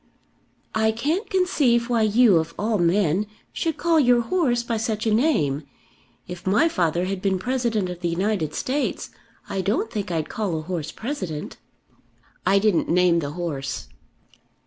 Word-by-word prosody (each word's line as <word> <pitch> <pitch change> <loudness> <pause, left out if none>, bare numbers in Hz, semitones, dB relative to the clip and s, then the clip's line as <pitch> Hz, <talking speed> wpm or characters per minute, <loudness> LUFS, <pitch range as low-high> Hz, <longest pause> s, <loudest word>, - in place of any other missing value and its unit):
"I 220 0 +2
can't 310 - -2
conceive 280 -11 +2
why 235 -2 +1
you 215 -2 +5
of 165 +1 -2
all 215 0 0
men 180 +2 +2 0.3
should 325 -2 -2
call 335 -2 +3
your 245 -4 +4
horse 245 -4 +1
by 235 -1 -2
such 220 -1 -2
a 220 - +2
name. 160 - +2 0.7
If 180 +1 -8
my 210 - +4
father 175 - 0
had 190 0 -3
been 195 -1 +1
President 235 -2 -1
of 180 -1 -6
the 175 -1 -1
United 175 -3 -1
States, 280 +3 -2 0.4
I 195 - -2
don't 210 +3 -1
think 205 -3 -3
I'd 160 -3 -1
call 200 -7 -2
a - - -3
horse 165 -2 -4
President." 185 - -5 0.9
"I 195 +1 +5
didn't 195 -3 +2
name 175 0 +4
the 145 -2 -4
horse." 145 -6 -4
210 Hz, 160 wpm, -23 LUFS, 175-240 Hz, 0.9 s, you